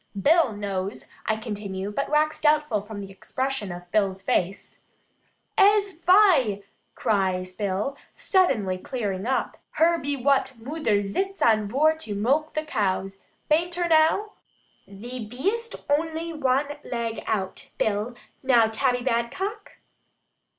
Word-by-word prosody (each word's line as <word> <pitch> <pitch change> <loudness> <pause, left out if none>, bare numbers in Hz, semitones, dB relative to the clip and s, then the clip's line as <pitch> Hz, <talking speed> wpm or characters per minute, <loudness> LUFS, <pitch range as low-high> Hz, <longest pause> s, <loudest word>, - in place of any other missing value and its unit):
Bill 320 - +4
knows," 200 -1 -4 0.2
I 220 - +2
continue, 205 -3 -5
but 275 +7 -2
wax 305 +1 +1
doubtful 300 -8 +2
from 205 0 -8
the 195 -1 -8
expression 260 +1 -3
of 175 0 -9
Bill's 195 -2 +1
face. 190 0 -1 0.8
"Ees 400 -3 +3
fai," 335 - +4 0.3
cries 185 -5 0
Bill, 205 +7 -2 0.2
suddenly 220 - +1
clearing 205 -3 -3
up, 265 - -1 0.2
"her 335 +1 +3
be 285 0 -2
wutt 270 0 +2
moother 230 -5 0
zits 385 - -2
on 215 -2 +4
vor 295 +8 +3
to 220 -10 -5
mulk 275 +10 +1
the 310 0 -1
coos. 195 -6 -1 0.3
Bain't 340 +3 +2
her 350 0 0
now?" 325 +6 +3 0.6
"Thee 235 +5 -7
bee'st 390 - -2
ony 320 +3 -1
wan 285 0 0
leg 235 -2 -3
out, 190 -3 -3
Bill. 215 +3 -1 0.3
Now 245 -4 +5
Tabby 245 +2 0
Badcock?" 260 - -2
245 Hz, 130 wpm, -25 LUFS, 205-310 Hz, 0.8 s, Now